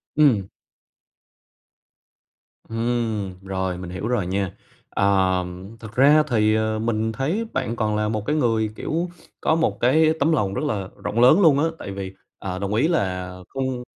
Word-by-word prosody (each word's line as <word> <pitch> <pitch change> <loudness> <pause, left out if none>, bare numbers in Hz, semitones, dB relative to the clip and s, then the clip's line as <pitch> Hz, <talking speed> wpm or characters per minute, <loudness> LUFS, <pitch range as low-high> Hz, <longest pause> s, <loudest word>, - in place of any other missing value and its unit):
Ừm. 125 -11 +4 2.2
Ừm, 115 -5 -2
rồi 95 -1 -2
mình 90 -1 -7
hiểu 95 +5 -4
rồi 120 -8 0
nha. 95 0 -1 0.4
Ờ, 95 -2 +2 0.3
thực 110 0 -10
ra 145 +4 +6
thì, 110 -4 +2
ờ, 110 0 0
mình 110 0 0
thấy 160 - -1
bạn 125 -3 -1
còn 110 -2 0
là 105 0 0
một 110 -1 -2
cái 150 - 0
người, 115 -6 +1
kiểu, 170 +3 -2 0.3
có 160 - +2
một 165 - +1
cái 155 +6 +4
tấm 150 +4 +3
lòng 100 -9 +1
rất 150 - -2
là 100 -8 -2
rộng 115 - -1
lớn 140 +11 +6
luôn 145 -5 +5
á, 160 - +3
tại 100 - -6
vì, 95 -1 -6 0.3
à, 95 -1 -4
đồng 100 +1 -2
ý 120 +9 +3
là 90 - -1 0.2
không 130 -2 -3
110 Hz, 165 wpm, -23 LUFS, 100-135 Hz, 2.2 s, ra